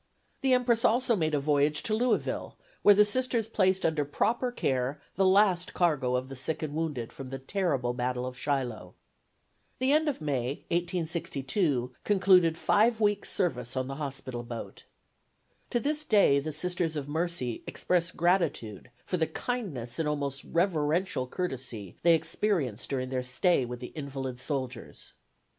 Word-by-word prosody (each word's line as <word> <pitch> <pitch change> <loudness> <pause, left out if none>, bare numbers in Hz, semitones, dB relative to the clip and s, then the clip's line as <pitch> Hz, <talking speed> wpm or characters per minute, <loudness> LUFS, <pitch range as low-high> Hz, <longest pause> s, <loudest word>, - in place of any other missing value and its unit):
The 265 -1 +3
"Empress" 245 -2 +2
also 240 +1 +3
made 155 -5 0
a - - +2
voyage 145 +1 +1
to 215 - -1
Louisville, 240 +3 0 0.2
where 205 - +7
the 210 +1 +6
Sisters 235 0 +1
placed 190 -4 +2
under 155 -2 +1
proper 235 - 0
care 135 - -1
the 195 -1 +2
last 185 -2 +3
cargo 145 -8 +2
of 130 +1 -1
the 135 - -8
sick 135 +5 -3
and 150 -2 -3
wounded 150 -7 -3
from 135 -2 -8
the 135 - -4
terrible 135 -5 -1
battle 125 0 -2
of 130 0 -5
Shiloh. 125 -10 -3 0.8
The 260 +2 +1
end 305 +1 +3
of 280 - -3
May, 135 -3 -2
1862, 165 - -1
concluded 185 -5 +4
five 220 +6 +3
weeks' 205 -2 +1
service 125 -8 -1
on 130 0 -1
the 135 0 -5
hospital 130 -3 -4
boat. 120 -1 -8 0.8
To 240 - +1
this 300 +4 0
day 200 - +4
the 155 +3 -4
Sisters 170 +1 -1
of 145 -2 -4
Mercy 160 -6 -1
express 175 -2 0
gratitude 165 - 0 0.2
for 180 - -1
the 160 -2 +1
kindness 160 - -4
and 155 -2 +1
almost 140 -2 -3
reverential 165 -4 0
courtesy 125 - -5
they 170 -1 +6
experienced 155 - -1
during 130 -2 -2
their 130 -1 -1
stay 125 +4 +2
with 120 0 -6
the 125 - -8
invalid 135 -4 -5
soldiers. 130 -3 -5
155 Hz, 155 wpm, -29 LUFS, 130-190 Hz, 0.8 s, where